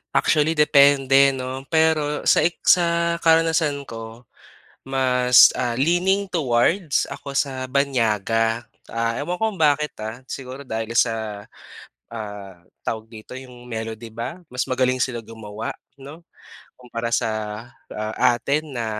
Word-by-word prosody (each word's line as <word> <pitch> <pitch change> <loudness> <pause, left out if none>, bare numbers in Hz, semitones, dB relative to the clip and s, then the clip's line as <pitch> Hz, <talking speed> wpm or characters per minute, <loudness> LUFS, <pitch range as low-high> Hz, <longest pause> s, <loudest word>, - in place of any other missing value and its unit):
Actually 150 +3 +2
depende 140 -2 +5
'no. 130 +1 -6
Pero 160 -2 +1
sa - - +4
ex 175 - -7 0.2
sa 170 0 0
karanasan 160 -3 +2
ko, 115 -1 -9 0.6
mas 125 -2 +5
ah, 120 -1 -1
leaning 180 +8 +1
towards 155 +3 +1
ako 140 -1 -8
sa 130 -2 -1
banyaga. 115 -4 0 0.3
Ah, 115 0 -1
ewan 165 +5 -3
ko 220 0 +1
kung - - -12
bakit 150 -1 +2
ah, 110 +4 -6
siguro 130 +1 -7
dahil 115 -3 -5
sa, 110 -4 0 0.7
ah, 105 -5 -8 0.2
tawag 110 0 -3
dito, 110 +3 -11
'yong 125 -2 -11
melody 115 0 -6
ba, 115 +10 -6
mas 125 -2 -2
magaling 130 0 +1
sila 120 -3 -3
gumawa 110 -1 -7 0.2
'no, 145 +5 -11 0.5
kumpara 120 -2 -5
sa, - - +1 0.6
ah, 110 0 -4 0.2
atin 145 +3 -2
na 115 -1 -2
130 Hz, 130 wpm, -22 LUFS, 115-150 Hz, 0.7 s, depende